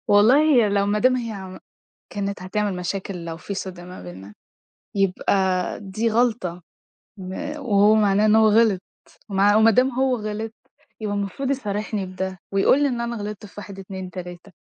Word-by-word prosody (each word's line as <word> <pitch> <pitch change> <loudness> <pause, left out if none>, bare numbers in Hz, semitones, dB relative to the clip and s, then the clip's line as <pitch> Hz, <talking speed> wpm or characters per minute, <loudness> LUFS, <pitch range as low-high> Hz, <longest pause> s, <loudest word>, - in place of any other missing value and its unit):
والله 210 +7 +6
هي 260 -9 +4
لو 200 0 +2
ما 205 +1 +1
دام 255 +3 +4
هي 205 -6 -5 0.5
كانِت 200 -2 -3
هتعمل 200 +1 -1
مشاكل 180 0 -4
لو 165 -1 -5
في 200 +4 -6
صِدْق 185 -2 -6
ما 180 - -10
بيننا 95 +3 -10 0.6
يبقى 190 -1 +1
دي 210 +3 -1
غلطة 215 -7 0 0.6
م 185 -1 -7 0.2
وهو 215 -6 +4
معناه 205 -1 +3
إن 215 0 +5
هو 220 0 +6
غِلط 215 -3 +4 0.5
مع 200 +1 +3
وما 220 +1 +6
دام 255 +5 +3
هو 260 +1 +1
غِلط 215 0 -4 0.5
يبقى 205 -1 -2
المفروض 205 +7 -2
يصارحني 210 -5 -2
بده، 185 0 -5 0.2
ويقول 195 +8 +4
لي - - +4
إن 240 -2 -2
أنا 235 0 -3
غلَطت 210 -1 -6
في 200 - -15
1 200 -1 -8
2 190 -1 -7
3 180 +1 -9
205 Hz, 170 wpm, -23 LUFS, 190-220 Hz, 0.6 s, والله